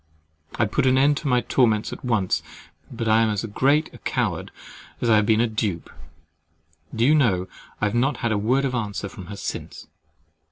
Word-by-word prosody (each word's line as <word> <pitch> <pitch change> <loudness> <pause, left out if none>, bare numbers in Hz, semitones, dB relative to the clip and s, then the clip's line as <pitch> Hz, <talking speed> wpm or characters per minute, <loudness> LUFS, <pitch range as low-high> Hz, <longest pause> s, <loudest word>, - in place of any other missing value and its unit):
I - - +1
would 105 - -2
put 135 +1 +1
an 130 0 +4
end 140 +2 +4
to 150 - -4
my 125 -2 +3
torments 110 -5 +1
at - - -10
once; 110 -7 0 0.5
but 115 -1 -4
I 110 +1 +4
am 115 - +2
as 105 +1 -2
great 140 +8 +1
a - - -13
coward - - -2 0.5
as 120 - +1
I 110 - +6
have 105 -1 +2
been 110 -1 +3
a - - +3
dupe. 105 -6 -3 1.0
Do 115 +1 +2
you 145 - +5
know 100 -12 +2 0.3
I - - 0
have 105 - -1
not 125 +2 +1
had 115 - -1
a 105 - +1
word 130 +6 +1
of 130 - -2
answer 105 -4 -3
from 95 -2 -10
her 100 0 -8
since! - - -6
115 Hz, 210 wpm, -23 LUFS, 105-130 Hz, 1.0 s, I